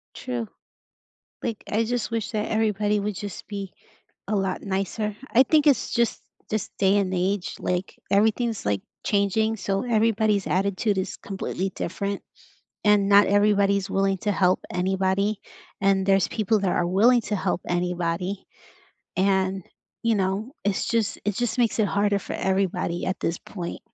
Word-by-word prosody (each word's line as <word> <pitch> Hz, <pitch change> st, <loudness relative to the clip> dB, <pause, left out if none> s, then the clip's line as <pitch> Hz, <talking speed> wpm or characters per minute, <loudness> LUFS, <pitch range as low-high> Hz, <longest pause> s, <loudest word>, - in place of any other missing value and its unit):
True. 245 Hz, -3 st, -4 dB, 1.0 s
Like, 230 Hz, -4 st, -4 dB
I 220 Hz, +2 st, +2 dB
just 235 Hz, -1 st, -2 dB
wish 225 Hz, -4 st, -2 dB
that 215 Hz, -2 st, -2 dB
everybody 210 Hz, -1 st, +1 dB
would 205 Hz, +1 st, -2 dB
just 205 Hz, -2 st, -7 dB
be 200 Hz, -2 st, -5 dB, 0.6 s
a 210 Hz, -, +1 dB
lot 195 Hz, -1 st, -1 dB
nicer. 200 Hz, +2 st, -2 dB
I 250 Hz, -, +6 dB
think 300 Hz, +3 st, +3 dB
it's 280 Hz, -6 st, +3 dB
just 235 Hz, -1 st, +1 dB, 0.3 s
just 215 Hz, 0 st, -3 dB
day 195 Hz, +1 st, +4 dB
and 190 Hz, -2 st, 0 dB
age, 185 Hz, +1 st, -1 dB
like, 180 Hz, +1 st, -3 dB
everything's, 220 Hz, -, +2 dB
like, 100 Hz, -2 st, 0 dB, 0.2 s
changing, 215 Hz, +2 st, +1 dB
so 195 Hz, -2 st, -1 dB
everybody's 220 Hz, -3 st, +2 dB
attitude 200 Hz, +2 st, +1 dB
is 190 Hz, 0 st, -3 dB
completely 195 Hz, -1 st, -4 dB
different, 200 Hz, +3 st, -3 dB, 0.6 s
and 210 Hz, -1 st, +4 dB
not 205 Hz, 0 st, +7 dB
everybody's 200 Hz, -1 st, +3 dB
willing 195 Hz, 0 st, +1 dB
to 210 Hz, -, 0 dB
help 185 Hz, -2 st, +2 dB
anybody 190 Hz, +3 st, 0 dB, 0.4 s
and 195 Hz, -1 st, +3 dB
there's 195 Hz, -1 st, +3 dB
people 220 Hz, 0 st, +1 dB
that 195 Hz, -2 st, 0 dB
are 175 Hz, -, +1 dB
willing 230 Hz, +7 st, +4 dB
to 210 Hz, -, -2 dB
help 185 Hz, -2 st, -1 dB
anybody, 180 Hz, +2 st, -1 dB, 0.7 s
and, 190 Hz, 0 st, +1 dB, 0.4 s
you 230 Hz, -1 st, +2 dB
know, 200 Hz, +5 st, -1 dB
it's 200 Hz, -2 st, 0 dB
just 230 Hz, -3 st, 0 dB
it 205 Hz, -, 0 dB
just 240 Hz, 0 st, -1 dB
makes 235 Hz, -3 st, +2 dB
it 215 Hz, -, +3 dB
harder 200 Hz, 0 st, +1 dB
for -, -, -8 dB
everybody 190 Hz, -2 st, -1 dB
at 185 Hz, -, -2 dB
this 170 Hz, -, -1 dB
point. 175 Hz, -4 st, -7 dB
200 Hz, 155 wpm, -25 LUFS, 190-215 Hz, 1.0 s, not